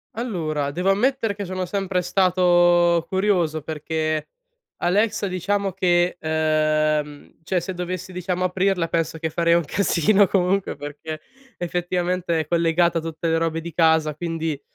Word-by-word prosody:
Allora, 160 Hz, -, -2 dB
devo 180 Hz, +6 st, +1 dB
ammettere 230 Hz, +1 st, +1 dB
che 205 Hz, -, -5 dB
sono 185 Hz, -1 st, -3 dB
sempre 190 Hz, -1 st, -1 dB
stato 175 Hz, -2 st, +3 dB
curioso 180 Hz, -6 st, +1 dB
perché 155 Hz, 0 st, -2 dB, 0.6 s
Alexa 205 Hz, +4 st, +1 dB
diciamo 195 Hz, +2 st, -1 dB
che, 175 Hz, -1 st, +1 dB
uhm, 155 Hz, -1 st, 0 dB
cioè 180 Hz, +3 st, -1 dB
se 175 Hz, +2 st, -5 dB
dovessi 180 Hz, +1 st, -5 dB
diciamo 180 Hz, 0 st, -3 dB
aprirla 185 Hz, -2 st, 0 dB
penso 165 Hz, -1 st, -1 dB
che 160 Hz, 0 st, -3 dB
farei 170 Hz, +1 st, +2 dB
un 170 Hz, -2 st, +1 dB
casino 200 Hz, +4 st, +3 dB
comunque 190 Hz, +1 st, 0 dB
perché 145 Hz, +2 st, -7 dB, 0.4 s
effettivamente 175 Hz, -1 st, -1 dB
è 155 Hz, -, -7 dB
collegata 170 Hz, +1 st, +2 dB
a -, -, -7 dB
tutte 165 Hz, +1 st, -4 dB
le 165 Hz, 0 st, +2 dB
robe 165 Hz, 0 st, -1 dB
di 165 Hz, 0 st, -8 dB
casa 160 Hz, -2 st, +3 dB
quindi, 165 Hz, -2 st, -3 dB
175 Hz, 140 wpm, -22 LUFS, 160-185 Hz, 0.6 s, stato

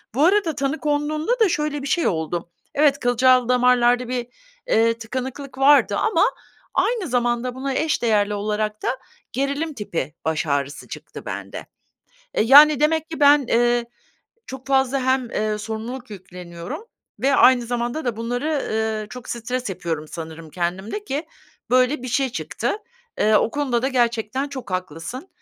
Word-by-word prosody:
Bu 285 Hz, +4 st, +4 dB
arada 360 Hz, -4 st, +3 dB
tanı 280 Hz, +2 st, -1 dB
konduğunda 305 Hz, -, 0 dB
da 440 Hz, -4 st, +5 dB
şöyle 300 Hz, -3 st, -1 dB
bir 275 Hz, -, -5 dB
şey 340 Hz, +4 st, +1 dB
oldu. 170 Hz, 0 st, -2 dB, 0.3 s
Evet, 285 Hz, -1 st, +4 dB
kılcal 250 Hz, 0 st, +3 dB
damarlarda 250 Hz, 0 st, +3 dB
bir, 245 Hz, -1 st, -3 dB, 0.4 s
eee, 230 Hz, -, +3 dB
tıkanıklık 260 Hz, +3 st, -6 dB
vardı 280 Hz, +2 st, +5 dB
ama 445 Hz, -, +2 dB, 0.5 s
aynı 455 Hz, -7 st, +1 dB
zamanda 240 Hz, -1 st, 0 dB
buna 270 Hz, +1 st, -3 dB
eş 310 Hz, +3 st, 0 dB
değerli 210 Hz, -3 st, +2 dB
olarak 210 Hz, +1 st, -2 dB
da -, -, -1 dB, 0.4 s
gerilim 280 Hz, +4 st, -2 dB
tipi 165 Hz, -, -4 dB
baş 160 Hz, 0 st, -1 dB
ağrısı 140 Hz, 0 st, -2 dB
çıktı -, -, -9 dB
bende. -, -, -6 dB, 0.7 s
E, -, -, +2 dB
yani, 290 Hz, +5 st, +8 dB
demek 315 Hz, +1 st, +1 dB
ki 320 Hz, -, -6 dB
ben, 290 Hz, -1 st, +6 dB
eee, 240 Hz, 0 st, +2 dB, 0.6 s
çok 265 Hz, 0 st, -9 dB
fazla 270 Hz, 0 st, +2 dB
hem, 260 Hz, -2 st, +1 dB
eee, 215 Hz, 0 st, -1 dB
sorumluluk 225 Hz, +4 st, -6 dB
yükleniyorum 180 Hz, -, -8 dB, 0.4 s
ve 275 Hz, +3 st, +3 dB
aynı 250 Hz, -2 st, +5 dB
zamanda 240 Hz, +5 st, -2 dB
da 240 Hz, -3 st, -2 dB
bunları, 245 Hz, +6 st, -2 dB
ııı, 220 Hz, -1 st, -1 dB
çok 250 Hz, +2 st, -10 dB
stres 245 Hz, 0 st, -3 dB
yapıyorum 160 Hz, -4 st, -4 dB
sanırım 160 Hz, -1 st, -8 dB
kendimde 185 Hz, -, -3 dB
ki 300 Hz, -1 st, -3 dB, 0.4 s
böyle 255 Hz, +2 st, +3 dB
bir 255 Hz, -, -5 dB
şey 265 Hz, +2 st, +1 dB
çıktı. 245 Hz, -, -3 dB, 0.4 s
Eee, 215 Hz, +1 st, +3 dB
o -, -, +2 dB
konuda 255 Hz, -3 st, -1 dB
da 265 Hz, -, +1 dB
gerçekten 240 Hz, +1 st, 0 dB
çok 260 Hz, -7 st, -8 dB
haklısın. 185 Hz, -, -5 dB
250 Hz, 155 wpm, -22 LUFS, 215-280 Hz, 0.7 s, yani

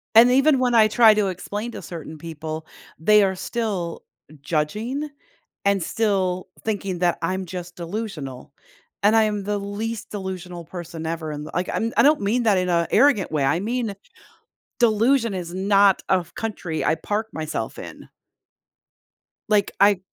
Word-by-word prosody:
And 240 Hz, +2 st, +8 dB
even 275 Hz, +1 st, +4 dB
when 250 Hz, -1 st, +2 dB
I 220 Hz, -2 st, +7 dB
try 220 Hz, 0 st, +6 dB
to 210 Hz, -2 st, +1 dB
explain 205 Hz, +5 st, -4 dB
to -, -, -8 dB
certain 160 Hz, -2 st, -8 dB
people, 160 Hz, -1 st, -6 dB, 0.3 s
they 210 Hz, +5 st, +5 dB
are 190 Hz, -1 st, +1 dB
still 195 Hz, -5 st, -3 dB, 0.4 s
judging 215 Hz, -, -2 dB, 0.6 s
and 200 Hz, -2 st, +2 dB
still 190 Hz, -4 st, 0 dB, 0.2 s
thinking 195 Hz, -4 st, -2 dB
that 175 Hz, -1 st, +2 dB
I'm 185 Hz, +3 st, -1 dB
just 180 Hz, 0 st, -7 dB
delusional, 165 Hz, -, -6 dB, 0.5 s
and 210 Hz, +2 st, +5 dB
I 225 Hz, -, +6 dB
am 210 Hz, -2 st, -1 dB
the 205 Hz, +1 st, -1 dB
least 210 Hz, +3 st, -4 dB
delusional 185 Hz, -3 st, -6 dB
person 170 Hz, -1 st, -7 dB
ever 160 Hz, -1 st, -3 dB
in 150 Hz, 0 st, -5 dB
the 155 Hz, -, -9 dB
like, 180 Hz, +1 st, -1 dB
I'm 230 Hz, +1 st, -1 dB
I -, -, +6 dB
don't 295 Hz, -2 st, +4 dB
mean 225 Hz, +5 st, +1 dB
that 210 Hz, -4 st, +3 dB
in 180 Hz, 0 st, 0 dB
a 170 Hz, -1 st, +2 dB
arrogant 235 Hz, -, +4 dB
way. 150 Hz, -3 st, 0 dB
I 135 Hz, +5 st, +2 dB
mean, 230 Hz, +1 st, -2 dB, 0.9 s
delusion 230 Hz, 0 st, +3 dB
is 175 Hz, -2 st, -5 dB
not 195 Hz, 0 st, +4 dB
a -, -, +6 dB
f 175 Hz, -, -13 dB
country 190 Hz, -8 st, -3 dB
I 160 Hz, -, +2 dB
park 210 Hz, +7 st, -2 dB
myself 155 Hz, -1 st, -4 dB
in. -, -, -10 dB, 1.4 s
Like, 210 Hz, -2 st, +3 dB
I 200 Hz, -1 st, +5 dB
195 Hz, 165 wpm, -23 LUFS, 170-220 Hz, 1.4 s, And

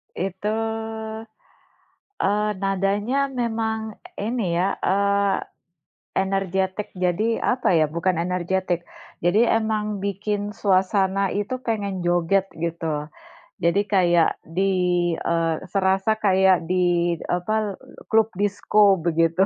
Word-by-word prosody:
Itu, 190 Hz, +2 st, -3 dB, 1.7 s
eee, 210 Hz, +2 st, +1 dB
nadanya 205 Hz, +8 st, 0 dB
memang 220 Hz, -3 st, -2 dB, 0.2 s
ini 210 Hz, -5 st, -1 dB
ya, 195 Hz, +2 st, +1 dB
eee, 200 Hz, +1 st, +2 dB, 0.7 s
energetik. 190 Hz, +1 st, -1 dB
Jadi 185 Hz, +5 st, 0 dB
apa 255 Hz, -6 st, +1 dB
ya, 155 Hz, -2 st, +3 dB
bukan 170 Hz, +2 st, 0 dB
energetik. 180 Hz, 0 st, -1 dB, 0.4 s
Jadi 175 Hz, +5 st, +4 dB
emang 215 Hz, -2 st, 0 dB
bikin 205 Hz, +1 st, -3 dB
suasana 195 Hz, 0 st, +1 dB
itu 205 Hz, +5 st, -2 dB
pengen 200 Hz, -5 st, -2 dB
joget 175 Hz, +2 st, +2 dB
gitu. 160 Hz, -2 st, -3 dB, 0.5 s
Jadi 170 Hz, +4 st, +3 dB
kayak 175 Hz, -4 st, +2 dB
di, 180 Hz, -1 st, +1 dB
eee, 165 Hz, -1 st, +1 dB
serasa 195 Hz, +3 st, +1 dB
kayak 190 Hz, -4 st, +3 dB
di 175 Hz, -1 st, +2 dB, 0.2 s
apa, 180 Hz, +4 st, -1 dB
l 215 Hz, -, -2 dB, 0.4 s
klub 225 Hz, 0 st, +3 dB
disko 205 Hz, 0 st, +3 dB
begitu. 165 Hz, +2 st, +2 dB
190 Hz, 100 wpm, -23 LUFS, 175-205 Hz, 1.7 s, Jadi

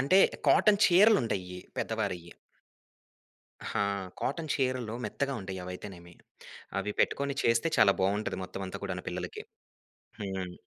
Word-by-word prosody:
అంటే, 140 Hz, +9 st, +5 dB, 0.3 s
కాటన్ 210 Hz, -2 st, +5 dB
చీరలుంటాయి 120 Hz, -, +4 dB, 0.2 s
పెద్దవారియ్యి. 100 Hz, -6 st, -2 dB, 1.3 s
ఆ! 115 Hz, -, -2 dB, 0.4 s
కాటన్ 155 Hz, +3 st, -2 dB
చీరలు 130 Hz, -4 st, -1 dB
మెత్తగా 140 Hz, -1 st, -2 dB
ఉంటాయి. 95 Hz, -1 st, -6 dB
అవయితేనేమి 90 Hz, -1 st, -9 dB, 0.7 s
అవి 105 Hz, -, -3 dB
పెట్టుకొని 140 Hz, 0 st, +1 dB
చేస్తే, 115 Hz, +7 st, +3 dB
చాలా 100 Hz, -2 st, +6 dB
బాగుంటది 105 Hz, +2 st, 0 dB
మొత్తమంతా 95 Hz, 0 st, -6 dB
కూడాను 90 Hz, -2 st, -4 dB
పిల్లలకి. 90 Hz, 0 st, -5 dB, 0.8 s
హ్మ్. 95 Hz, -3 st, -4 dB
105 Hz, 105 wpm, -30 LUFS, 90-135 Hz, 1.3 s, చాలా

